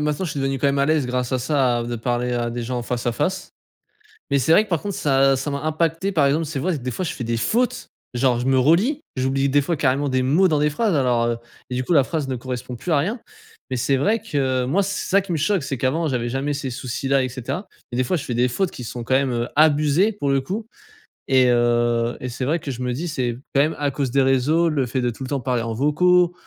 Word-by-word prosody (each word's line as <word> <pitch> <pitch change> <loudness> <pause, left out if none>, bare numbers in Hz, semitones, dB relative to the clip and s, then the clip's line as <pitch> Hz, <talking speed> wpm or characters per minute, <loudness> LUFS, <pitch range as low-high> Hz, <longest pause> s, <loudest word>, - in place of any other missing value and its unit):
maintenant 150 +4 -1
je 160 - -3
suis 145 - -4
devenu 135 0 -1
quand 135 - +1
même 140 0 +1
à 140 - +2
l'aise 155 -3 +2
grâce 125 0 -2
à 130 - +1
ça 125 -2 +1
de 120 0 -4
parler 120 +1 -1
à 120 -1 -1
des 120 0 -4
gens 125 +1 -3
en - - -4
face 120 0 -3
à 120 - +2
face. 180 +9 -2 0.8
Mais 140 - +2
c'est 145 +6 +3
vrai 210 - +6
que 215 - -15
par 170 -4 0
contre 200 -2 -4
ça 135 -1 +3
ça 145 +2 -3
m'a 140 - -2
impacté 165 +4 0
par 155 -5 +3
exemple, 150 +4 +1
c'est 150 -2 -4
vrai, 175 +3 -1
des 130 -1 -4
fois 125 - -3
je 170 - -2
fais 125 - -5
des 115 0 -1
fautes 240 - 0 0.2
genre 125 -1 +2
je 120 - -3
me 135 0 +3
relis. 180 - +3 0.2
J'oublie 135 +1 +1
des 145 - +4
fois 170 +5 -1
carrément 140 0 +1
des 130 -1 +1
mots 160 +9 +4
dans 155 -4 +1
des 150 +1 +2
phrases 200 +5 0
alors, 125 -4 +2
heu 120 0 0 0.3
et 125 - -3
du 125 - -1
coup 130 - -5
la 140 -6 +5
phrase 155 -5 -3
ne 130 - -2
correspond 125 0 -6
plus 170 +6 -2
à - - +4
rien. 210 - -2 0.5
Mais - - -2
c'est 135 +2 +1
vrai 210 - +1
que, 135 - -1
moi 160 +11 +1
c'est 200 +1 -3
ça 200 - +5
qui 190 -2 -5
me 160 - 0
choque 175 +3 +1
c'est 135 -1 -3
qu'avant 135 +7 0
j'avais 120 -4 -1
jamais 135 +4 -2
ces 140 -2 -4
soucis-là 135 +2 -1
et 130 - 0
cetera. 130 - -5 0.2
Et 120 - -3
des 130 - +1
fois 180 - 0
je 150 - -3
fais 125 - -4
des 125 +1 +3
fautes 180 +9 -1
qui 125 - -8
sont 120 +1 -6
quand 130 +3 +1
même, 135 -1 +1
heu, 120 0 -2
abusées 155 +6 +4
pour 145 -9 -2
le 135 0 +3
coup. 200 +11 -5 0.6
Et, 130 -1 +5
heu 120 0 +2
et 130 - -5
c'est 125 +1 -5
vrai 155 +6 +1
que 145 - -5
je 125 0 -7
me 125 - -1
dis 150 +8 -3
c'est 125 -6 -2 0.2
quand 140 - +5
même 155 +2 +1
à 145 -1 +1
cause 135 -2 -2
des 140 - +3
réseaux. 135 +6 +3
Le 145 -5 0
fait 125 +2 -2
de 125 - 0
tout 120 +3 -7
le 130 - -6
temps 140 - -1
parler 125 -1 -1
en 115 -1 -3
vocaux. 175 +7 +3
135 Hz, 280 wpm, -22 LUFS, 125-155 Hz, 0.8 s, vrai